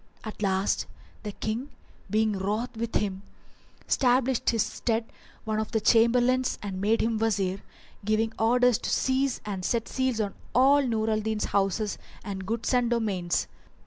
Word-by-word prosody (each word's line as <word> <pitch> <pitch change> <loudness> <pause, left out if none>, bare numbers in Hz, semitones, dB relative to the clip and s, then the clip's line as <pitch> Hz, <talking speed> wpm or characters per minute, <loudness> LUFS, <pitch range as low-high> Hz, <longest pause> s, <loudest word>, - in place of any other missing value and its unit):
At 215 -1 -8
last 195 -1 +1 0.3
the 210 - -5
King, 230 +8 -3 0.4
being 215 0 +2
wroth 210 +5 -2
with 230 0 -4
him, 195 -2 -1 0.6
stablished 255 -1 +2
in - - +1
his 225 - +2
stead 225 -1 -1 0.4
one 215 0 -1
of 220 - -3
his 220 -2 0
Chamberlains 245 +3 +3
and 190 -2 -4
made 220 +3 +2
him 225 -1 0
Wazir, 195 -4 0 0.4
giving 215 +2 +1
orders 245 +1 +4
to - - -4
seize 265 0 +1
and 195 -3 -4
set 230 +4 0
seals 260 -3 -1
on 205 -2 -1 0.2
all 275 +3 +6
Nur 225 -4 0
al 215 - +1
Din's 215 0 -1
houses 200 +1 0 0.2
and 190 -2 -6
goods 230 +2 -1
and 245 -2 +3
domains. 200 -7 0
220 Hz, 160 wpm, -27 LUFS, 205-240 Hz, 0.6 s, all